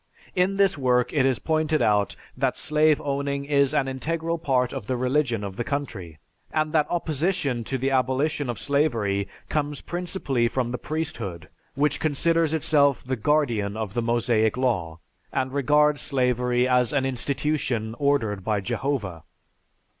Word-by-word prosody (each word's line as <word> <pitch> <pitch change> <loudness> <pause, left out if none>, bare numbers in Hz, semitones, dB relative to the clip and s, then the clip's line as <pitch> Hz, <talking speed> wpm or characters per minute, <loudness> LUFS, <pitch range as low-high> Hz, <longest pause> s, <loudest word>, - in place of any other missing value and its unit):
In 190 +2 +2
this 195 -6 +3
work 125 -2 +2
it 140 -4 +3
is 130 -3 +1
pointed 155 +3 0
out 105 -2 +2 0.2
that 130 0 0
slave 155 0 +3
owning 140 0 -2
is 140 -1 +3
an 145 -3 +1
integral 165 +5 -2
part 130 -6 +1
of 100 - -6
the 130 - -1
religion 125 -3 0
of 100 -1 -6
the - - -1
country, 110 - -4 0.3
and 155 0 0
that 155 -2 +3
opposition 160 -6 -1
to 135 - -2
the 135 +2 -1
abolition 135 +2 0
of 120 - -3
slavery 115 -9 0 0.2
comes 145 -2 -2
principally 175 -9 -1
from 120 0 -1
the 125 - -3
priesthood 150 - -4 0.3
which 145 0 +1
considers 160 +1 +1
itself 145 -3 +2
the 130 +1 -2
guardian 115 -6 0
of 110 -3 -4
the 120 - 0
Mosaic 115 -1 +1
law, 95 -11 -1 0.3
and 130 0 -1
regards 150 +1 +3
slavery 125 -2 +1
as 125 -2 +3
an 140 -2 +1
institution 130 -3 -1
ordered 115 -9 +1
by 105 0 0
Jehovah. 100 - -3
135 Hz, 155 wpm, -25 LUFS, 120-150 Hz, 0.3 s, this